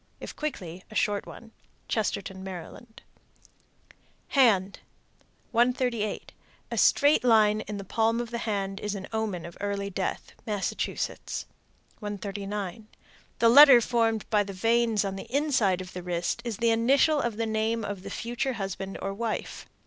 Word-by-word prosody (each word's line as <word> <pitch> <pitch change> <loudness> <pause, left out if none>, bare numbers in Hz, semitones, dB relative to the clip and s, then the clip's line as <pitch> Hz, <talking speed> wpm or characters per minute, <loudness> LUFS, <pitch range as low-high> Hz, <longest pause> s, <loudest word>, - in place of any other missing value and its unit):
If - - -8
quickly, 185 - -5
a 215 - -12
short 205 -1 0
one. 225 -1 -11 0.4
Chestertown, 195 -3 -2
Md. 190 +5 -8 1.4
HAND. 205 -8 +3 0.7
138. 240 -3 0 0.4
A - - -3
straight 290 -1 +4
line 215 -3 +4
in 210 - -6
the 200 - -6
palm 225 +4 +1
of 240 -1 -4
the 235 - -3
hand 200 -3 -2
is 210 0 -3
an 190 -1 -6
omen 215 -6 -2
of 170 - -9
early 200 -1 -2
death. 190 0 -3 0.2
Massachusetts. 205 -3 -3 0.5
139. 205 0 -5 0.5
The 230 - +5
letter 275 0 +10
formed 225 -2 0
by 210 -1 +4
the 200 0 -7
veins 225 +1 +2
on 195 0 -3
the - - -9
inside 250 -10 +2
of 185 0 -9
the 180 - -5
wrist 175 +5 -2
is 235 -4 -4
the 230 0 +2
initial 275 +6 +3
of 235 -3 -2
the 230 - 0
name 220 0 -1
of 200 -2 -5
the - - -8
future 240 +3 -2
husband 195 -2 -5
or 195 - -2
wife. 225 +2 -4
215 Hz, 150 wpm, -27 LUFS, 195-235 Hz, 1.4 s, letter